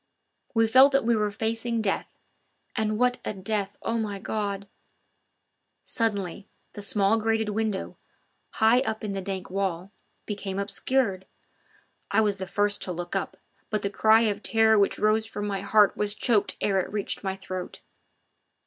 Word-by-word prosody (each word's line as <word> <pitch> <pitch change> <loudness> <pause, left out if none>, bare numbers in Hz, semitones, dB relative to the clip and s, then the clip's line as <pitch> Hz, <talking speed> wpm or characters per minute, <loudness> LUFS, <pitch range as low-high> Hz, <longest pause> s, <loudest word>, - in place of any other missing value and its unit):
We 225 0 +4
felt 260 +5 +6
that 275 - +3
we 235 0 +3
were 210 -1 +1
facing 225 +3 -2
death 205 -3 -1 0.7
and 215 -2 0
what 250 +1 +2
a - - -3
death, 200 +1 -2
O 230 0 -1
my 210 -2 -3
God! 200 -1 -3 1.2
Suddenly 200 -4 -2 0.2
the 205 - -7
small 200 +2 +2
grated 220 0 0
window 210 -2 -2 0.6
high 225 +3 +4
up 220 -5 -3
in 205 -2 -3
the 195 - -3
dank 190 -1 -5
wall 190 -1 -2 0.3
became 200 -2 -4
obscured. 200 0 0 0.8
I - - +2
was 205 -2 +1
the 190 -1 -5
first 205 +1 0
to 185 - -3
look 175 0 -5
up, - - -2 0.3
but 215 - -1
the 200 - -1
cry 220 +2 +5
of 210 -2 0
terror 220 -1 +4
which 200 - +2
rose 215 +1 +2
from 205 -1 -5
my 200 -2 -2
heart 205 +1 +4
was 205 0 0
choked 220 -3 +1
ere 195 -2 +2
it 185 - -3
reached 205 0 -2
my 190 -1 -2
throat. 185 -1 -7
210 Hz, 165 wpm, -26 LUFS, 195-220 Hz, 1.2 s, felt